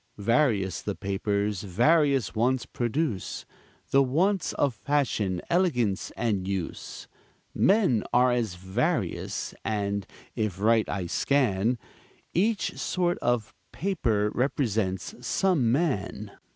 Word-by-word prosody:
Various 105 - +1
the - - -3
papers 100 0 -1
various 135 - +2
wants 120 +3 +1
produce, 120 - -2 0.5
The 135 - +6
wants 165 +8 +1
of 140 -3 +1
fashion, 110 -8 -1
elegance 125 - +1
and 100 -6 0
use. 95 -3 -5 0.5
Men 190 - +3
are 125 +1 +4
as 115 -7 -1
various; 95 +2 -2
and, 100 -2 -2 0.3
if 105 -4 -2
right 110 +1 +3
I 95 -3 -2
scan, 120 +1 +1 0.6
Each 205 +4 0
sort 175 -1 0
of 120 -3 0 0.2
paper 115 - 0
represents 110 -7 -1
some 145 -4 +2
man. 115 - -1
115 Hz, 105 wpm, -27 LUFS, 100-145 Hz, 0.6 s, The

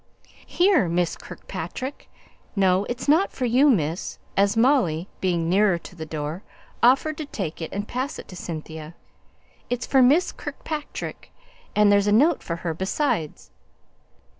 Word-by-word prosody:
"Here, 355 - +3
Miss 175 0 0
Kirkpatrick! 265 +2 -7 0.5
No, 190 0 +3
it's 240 +3 -4
not 320 +7 +4
for 255 - -3
you, 255 +5 +4
miss!" 165 - 0 0.2
as 200 +2 +3
Molly, 210 - +3
being 175 -3 0
nearer 190 +1 +3
to 170 - -12
the 160 -2 -7
door, 155 +3 -4 0.4
offered 275 +5 +3
to 310 - -3
take 175 - -5
it 160 - -5
and 205 +1 -4
pass 260 +4 -3
it - - -9
to 185 - -9
Cynthia. 160 -1 -7 0.7
"It's 245 0 -2
for 270 - +4
Miss 290 +8 +4
Kirkpatrick; 300 -2 -6 0.4
and 210 -1 +5
there's 200 0 +4
a - - +3
note 290 +9 +4
for 170 - -4
her 165 - 0
besides!" 170 - -2
200 Hz, 150 wpm, -24 LUFS, 170-265 Hz, 0.7 s, and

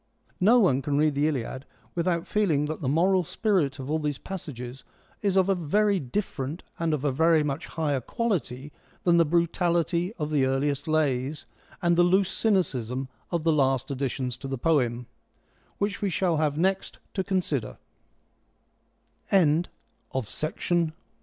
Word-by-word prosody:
No 220 +7 +6
one 175 - +4
can 140 +1 -1
read 150 0 +3
the 145 +2 +2
Iliad 130 -2 -3 0.3
without 170 -1 0
feeling 165 -9 +1
that 155 +2 -4
the 130 - 0
moral 180 +5 +3
spirit 170 -7 0
of 135 -2 -6
all 155 +2 0
these 150 -2 -2
passages 135 -9 -7 0.4
is 195 -2 +1
of 190 -1 +4
a 195 - +4
very 195 +4 +2
different 145 0 -4 0.2
and 165 -1 0
of 145 0 -5
a 145 - +2
very 160 +3 +4
much 145 +1 -3
higher 145 -5 -1
quality 150 - -2 0.3
than 170 -1 +4
the 170 - +5
brutality 170 +1 +1
of 150 -7 -4
the 145 -3 +3
earliest 140 +2 0
lays, 145 -2 0 0.4
and 170 0 +4
the 175 - +5
loose 185 +2 +3
cynicism 135 - 0 0.2
of 170 -3 -1
the 165 -1 +3
last 135 -3 +1
additions 130 -2 -2
to 135 - -7
the 135 0 -3
poem, 125 -5 +1 0.7
which 200 0 -2
we 200 - +1
shall 175 -2 +1
have 150 -2 0
nex 190 +3 +1
155 Hz, 145 wpm, -27 LUFS, 135-180 Hz, 0.7 s, No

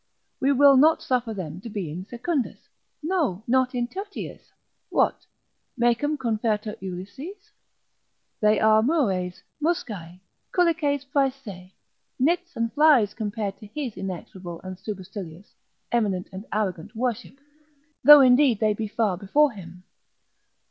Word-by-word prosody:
We 270 +1 +2
will 280 0 +6
not 315 +4 +5
suffer 245 -3 0
them 180 -4 -6
to 230 - -8
be 195 -7 -4
in 180 +4 -6
secundis, 255 +3 -3 0.3
no, 305 - 0
not 255 +1 +2
in 240 -1 0
tertiis; 395 - -8 0.4
what, - - +1 0.5
Mecum 240 +5 +1
confertur 220 -3 -1
Ulysses? 265 - -8 0.9
they 210 0 +3
are 220 0 +5
Mures, 200 - 0 0.2
Muscae, 205 - -3 0.3
culices 310 -5 +1
prae 275 -1 +2
se, 200 -9 -12 0.4
nits 345 +6 0
and 230 0 -2
flies 285 -9 +5
compared 210 -2 -4
to 210 - -11
his 250 0 -5
inexorable 180 -2 -7
and 185 0 -8
supercilious, 190 -3 -8 0.4
eminent 200 -6 0
and 190 +2 -8
arrogant 195 -2 -3
worship: 245 +2 -3 0.7
though 295 +2 +10
indeed 255 -3 +5
they 215 -1 +2
be 215 +1 -4
far 205 -3 0
before 285 +10 +3
him. 180 -4 -12
225 Hz, 130 wpm, -25 LUFS, 195-280 Hz, 0.9 s, though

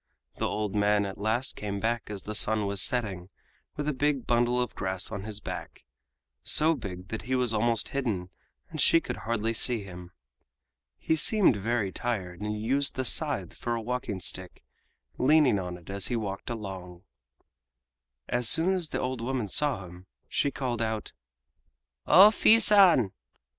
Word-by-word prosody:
The - - -1
old 105 -2 -3
man 105 0 +2
at 95 - -7
last 110 +5 -1
came 100 -1 -4
back 115 +2 -2
as 100 -3 -6
the 105 - -6
sun 105 0 +1
was 100 -1 +1
setting, 100 -9 -1 0.5
with 145 0 -4
a 150 - 0
big 140 -1 0
bundle 120 +1 +1
of 125 -2 -2
grass 95 +1 -3
on 100 -2 -5
his 105 -1 -5
back—so 70 - -2
big 95 - -8
that 110 - -4
he 130 +4 -2
was 125 -3 +1
almost 115 0 +1
hidden 105 -10 -3 0.4
and - - -2
she 165 - +5
could - - -6
hardly 115 0 -2
see 115 -1 +1
him. 90 -2 -10 0.9
He 160 - 0
seemed 200 - +3
very 105 0 -1
tired 95 -7 -4
and 105 0 -3
used 135 +6 -1
the 130 - -2
scythe 135 - +1
for 120 -1 -3
a 115 - -3
walking 120 -4 -3
stick, 90 0 -2 0.6
leaning 140 -6 +4
on 90 -1 -5
it 90 +2 -11
as 100 0 -2
he 125 - -2
walked 100 -2 -4
along. 95 -6 -7 1.2
As 120 -2 +1
soon 175 +4 +5
as 175 -4 -3
the - - -3
old 130 -2 -3
woman 120 -3 -2
saw 130 -5 +1
him 90 +1 -14 0.2
she 140 - 0
called 125 -4 -3
out: 110 -1 -3 0.9
"O 195 +4 +9
Fii 220 +1 +5
San! 190 - +5
110 Hz, 170 wpm, -28 LUFS, 100-130 Hz, 1.2 s, O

